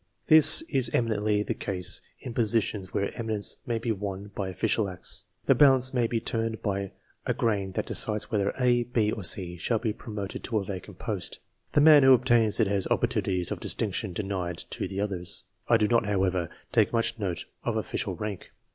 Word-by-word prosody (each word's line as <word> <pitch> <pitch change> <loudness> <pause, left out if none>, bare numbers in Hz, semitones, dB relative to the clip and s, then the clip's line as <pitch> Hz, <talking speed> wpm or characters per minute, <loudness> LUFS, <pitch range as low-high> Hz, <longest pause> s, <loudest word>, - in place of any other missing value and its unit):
This 155 0 +7
is 135 -6 0
eminently 105 -2 +1
the - - -2
case 90 -3 +1 0.2
in 125 - -7
positions 110 -4 0
where 100 - -2
eminence 110 -4 0
may 120 -1 0
be 115 +1 -2
won 100 -1 -5
by 95 -2 -3
official 95 +3 0
acts. 90 - -4 0.2
The - - +5
balance 130 -3 +4
may 120 -2 +2
be 115 0 -1
turned 115 0 -3
by 100 -1 -2 0.3
a - - 0
grain 100 -4 -1
that - - -2
decides 105 +2 -1
whether 100 -2 +1
A, 125 -1 +3
B, 115 -3 0
or 105 - -5
C 90 -1 0
shall 115 +8 0
be 110 -1 -2
promoted 105 -3 -6
to 115 - -1
a 100 - 0
vacant 95 -2 -7
post. - - -4 0.4
The 145 - +4
man 150 -1 +8
who 130 -1 +8
obtains 120 -4 +2
it 115 - +4
has 100 -1 -1
opportunities 100 -7 0
of - - -3
distinction - - -2
denied 90 -2 -3
to - - -3
the 95 - -5
others. 95 -4 -3 0.2
I 115 - +5
do 105 -1 +2
not, 115 -2 +2
however, 95 -4 0 0.2
take - - +3
much 115 0 0
note 95 -5 -3 0.2
of - - -1
official - - -3
rank. 105 -3 -6
105 Hz, 190 wpm, -27 LUFS, 95-115 Hz, 0.4 s, man